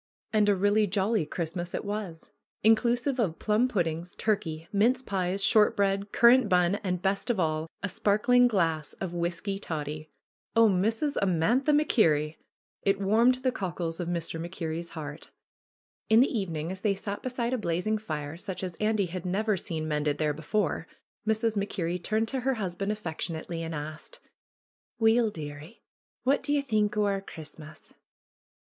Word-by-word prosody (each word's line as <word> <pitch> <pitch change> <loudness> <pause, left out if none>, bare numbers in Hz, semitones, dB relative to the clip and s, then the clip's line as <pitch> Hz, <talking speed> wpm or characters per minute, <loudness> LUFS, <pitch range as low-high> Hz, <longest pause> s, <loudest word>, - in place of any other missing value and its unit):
And 210 -1 +4
a 205 - +4
really 205 +2 +3
jolly 195 -2 +1
Christmas 175 +2 -4
it - - -4
was! 200 -5 -5 0.3
Inclusive 240 +4 +3
of 180 -8 0
plum 215 +4 +2
puddings, 175 -6 -2
turkey, 165 -7 -1
mince 240 +6 +3
pies, 195 -2 -1
short 215 -2 +4
bread, 200 0 +1
currant 240 -1 +6
bun, 180 0 +3
and, 180 -2 -2
best 195 +4 0
of 230 -5 +1
all, 155 -1 0 0.2
a - - +1
sparkling 215 +6 +3
glass 165 -9 0
of 185 -3 -5
whisky 175 +3 -2
toddy! 155 -3 -5 0.5
(Oh, 230 0 +7
Mrs. 220 +9 +1
Amantha 200 - +2
MacKerrie!) 165 - +3 0.4
It 195 0 +1
warmed 230 +6 +3
the 255 - +2
cockles 175 -6 -3
of 175 - -3
Mr. 170 -1 -2
MacKerrie's 170 -1 -4
heart. 150 0 -7 0.8
In 220 +1 +6
the 255 +1 +3
evening, 170 -5 -2
as 190 0 -6
they 205 -3 +1
sat 200 +1 -5
beside 250 -1 -2
a - - +1
blazing 215 +4 -1
fire 155 -6 -5
such 190 +1 -5
as 180 -2 -3
Andy 215 -2 +1
had 180 0 -6
never 205 +4 0
seen 160 -3 -4
mended 150 -1 0
there 150 -1 +1
before, 160 +2 -1 0.4
Mrs. 220 0 +1
Mac 200 0 -1
Kerrie 175 -1 -2
turned 215 +5 0
to 265 - -2
her 265 +1 0
husband 195 -1 -2
affectionately 165 -4 -4
and 165 -1 -4
asked: 150 +1 -7 0.8
^^Weel, 225 0 +4
dearie, 150 +3 -9 0.4
wha' 275 +2 +4
dae 290 - -2
ye 290 - +3
think 210 -5 0
o' 210 - +3
our 195 -1 0
Christmas?" 155 -3 -11
195 Hz, 165 wpm, -28 LUFS, 165-220 Hz, 0.8 s, Oh